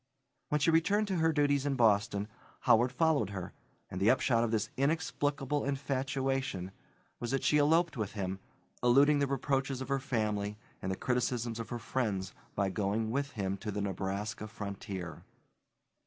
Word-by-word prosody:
When 150 - +2
she 155 +3 +3
returned 200 +6 +3
to 190 - 0
her 160 0 +3
duties 145 -2 +2
in 140 - +1
Boston, 105 -3 +3 0.3
Howard 120 +3 +4
followed 140 - +2
her, 95 -3 -6 0.3
and 90 - -6
the 100 - +5
upshot 120 -2 +3
of 120 - +1
this 110 +1 -1
inexplicable 145 -1 0
infatuation 135 -7 -1 0.5
was 120 - -3
that 135 +1 0
she 150 - +4
eloped 160 +2 +3
with 110 -3 -3
him, 95 -2 -3 0.4
eluding 140 +4 +5
the 140 - +2
reproaches 135 -1 0
of 130 0 -6
her 140 0 +1
family 105 -6 -1 0.2
and 95 - -2
the - - -1
criticisms 120 -1 -1
of 115 - -5
her 120 - -3
friends 105 -6 -2 0.2
by 100 -1 +1
going 110 +2 -1
with 140 +3 -1
him 100 -2 -2
to 105 - -6
the 105 0 -2
Nebraska 100 +2 -3
frontier. 100 -5 -6
120 Hz, 165 wpm, -32 LUFS, 105-140 Hz, 0.5 s, the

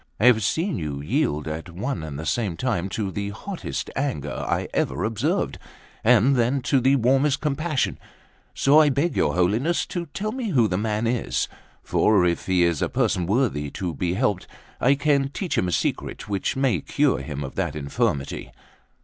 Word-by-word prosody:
I 110 - +2
have 120 -3 +6
seen 165 - 0
you 75 -3 -4
yield 80 - 0
at 80 +2 -5
one 105 +10 -3
and 75 -3 -6
the 80 - -5
same 90 +2 -1
time 95 -5 -1
to 100 0 -3
the 100 +1 -3
hottest 180 - -5
anger 125 - -2 0.2
I - - 0
ever 70 +7 0
observed, 110 -1 -1 0.4
and 125 +3 +5
then 125 +2 +1
to 135 +1 +3
the 135 +3 +4
warmest 135 +3 +2
compassion; 150 0 -1 0.6
so 145 +3 +5
I 155 -2 +6
beg 145 +5 0
your - - +1
Holiness 110 - +1
to 175 -2 -4
tell 210 +8 -3
me 250 -3 -3
who 125 - +3
the 90 - -1
man 105 +2 -1
is; 120 0 0 0.4
for 100 -4 +3
if 85 -1 -1
he 90 -2 +3
is 85 -3 +1
a - - +1
person 90 -2 0
worthy 100 - +1
to 90 +2 -4
be 90 +4 -1
helped, 100 -1 0 0.3
I 135 +3 +4
can 140 -1 +2
teach 175 +3 -3
him 90 - +1
a - - -1
secret - - -2
which 100 +5 -1
may 130 - +1
cure - - +1
him 75 -2 -5
of 65 - -6
that - - -2
infirmity." 70 -1 -2
110 Hz, 185 wpm, -24 LUFS, 85-140 Hz, 0.6 s, have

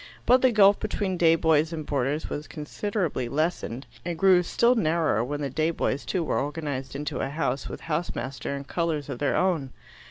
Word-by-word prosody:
But 250 +1 +5
the 255 - +5
gulf 205 -2 +6
between 205 -3 -2
day 165 -2 +5
boys 160 -1 +2
and 155 -2 -5
boarders 145 +2 -1
was 145 0 -5
considerably 160 - -3
lessened, 145 -3 -2 0.2
and 170 +2 -3
grew 185 0 +5
still 235 +7 +3
narrower 160 - +1
when 145 +4 -4
the 140 - -2
day 155 +4 +1
boys 150 -3 -1
too 180 -3 -1
were - - 0
organized 140 -3 -4
into 145 0 -3
a - - -1
House 140 -3 -2
with - - -7
house 165 +2 -2
master 135 +2 -4
and 140 0 -7
colours 165 -4 -2
of 120 - -5
their 145 - +1
own. 170 -8 +1
155 Hz, 195 wpm, -26 LUFS, 140-175 Hz, 0.2 s, gulf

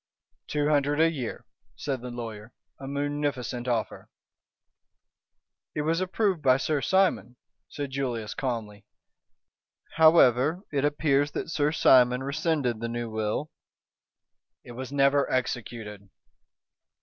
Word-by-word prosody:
"Two 150 -1 0
hundred 145 0 +2
a 165 0 +4
year," 130 -7 -5 0.3
said 135 -4 -4
the 125 - -6
lawyer. 115 -2 -8 0.2
"A 135 - -8
munificent 140 -4 -3
offer." 115 -3 -2 1.7
"It 150 - -1
was 165 +3 0
approved 190 -2 0
by 130 -2 +4
Sir 145 +1 -1
Simon," 190 - +1 0.3
said 140 -2 -5
Julius, 120 -6 -3
calmly. 110 -5 -4 1.1
"However, 155 - +5
it 140 -2 0
appears 145 -1 +2
that - - -4
Sir 150 -2 +1
Simon 125 -4 +4
rescinded 140 -4 -1
the 115 +1 -3
new 120 -1 -4
will 110 +7 -2 0.5
" - - -63
"It - - -10
was 130 +2 -7
never 140 0 +2
executed." 110 -5 -4
135 Hz, 120 wpm, -27 LUFS, 120-150 Hz, 1.7 s, However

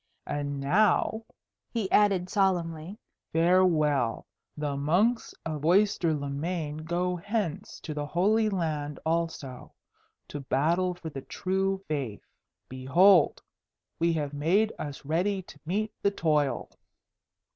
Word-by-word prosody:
"And 145 -1 -3
now," 210 +8 +2 0.4
he 220 -5 -3
added 195 -4 +4
solemnly, 180 -2 0 0.4
"farewell. 160 -7 +3 0.3
The 145 -1 -2
monks 180 - +1
of 155 -3 -4
Oyster 185 0 +3
le 145 -1 -4
Main 155 +1 -3
go 175 +3 -1
hence 200 -2 -3
to 155 - -5
the 145 -1 -4
Holy 210 +7 +2
Land 155 -6 -2
also, 160 -6 -3 0.6
to 145 - -5
battle 165 +7 +1
for 165 -2 -8
the 135 - -6
true 190 +4 -2
Faith. 135 -9 -4 0.4
Behold! 155 +7 +4 0.6
we 170 +1 +3
have 150 -3 -2
made 185 +10 +2
us 145 -2 -6
ready 185 +6 0
to 145 - -14
meet 210 +5 -1
the 200 - +3
toil." 150 -7 0
165 Hz, 120 wpm, -28 LUFS, 145-190 Hz, 0.6 s, added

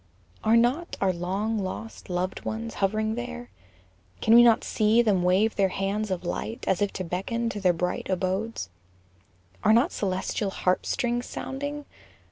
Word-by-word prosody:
Are 225 +2 +5
not 255 +9 +1
our 190 -1 +2
long 195 +6 -2
lost 205 +3 -6
loved 180 +1 -2
ones 225 +1 -4
hov'ring 215 +2 +1
there, 240 +1 -6 0.7
Can 220 - +3
we 235 - +10
not 235 -2 +5
see 220 +2 +3
them 200 -5 +2
wave 190 +5 +3
their 195 -1 +3
hands 200 +3 -2
of 185 -2 -2
light, 225 +7 -4
As 190 - +1
if 205 - +1
to 185 - -3
beckon 215 +7 -2
to 205 -3 -5
their 185 -2 +4
bright 180 +2 -2
abodes? 190 - -2 0.9
Are 215 - +5
not 245 +10 +4
celestial 195 +1 -2
harp 185 -1 0
strings 245 -2 -1
sounding? 285 +2 -5
215 Hz, 160 wpm, -26 LUFS, 185-235 Hz, 0.9 s, we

